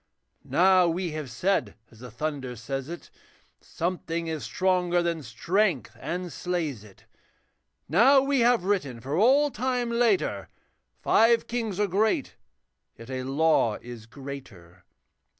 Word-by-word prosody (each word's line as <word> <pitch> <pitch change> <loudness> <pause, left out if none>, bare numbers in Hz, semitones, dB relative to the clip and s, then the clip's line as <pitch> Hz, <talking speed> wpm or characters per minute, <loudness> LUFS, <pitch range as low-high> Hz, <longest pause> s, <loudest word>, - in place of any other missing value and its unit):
Now 185 0 +4
we 170 +1 -2
have 155 -3 -5
said 185 +12 -1 0.2
as 110 - -18
the 125 +1 -9
thunder 140 -5 -4
says 135 +5 -5
it, 175 - -9 0.5
Something 170 -1 -3
is 160 -4 -4
stronger 180 +6 +1
than 170 -2 -1
strength 165 - -1
and 180 -2 -4
slays 155 - -3
it. 100 -3 -18 0.8
Now 240 - +6
we 275 0 +1
have 235 -4 +3
written 180 -11 -1
for 135 +5 -4
all 270 - +4
time 250 0 -1
later, 240 +10 +1 0.5
Five 230 +1 +4
kings 225 -5 -3
are 210 - +3
great, 205 +3 0 0.6
yet 115 +3 -11
a 130 0 -3
law 135 -4 +2
is 120 -2 -10
greater. 115 -11 -11
170 Hz, 135 wpm, -26 LUFS, 130-205 Hz, 0.8 s, Now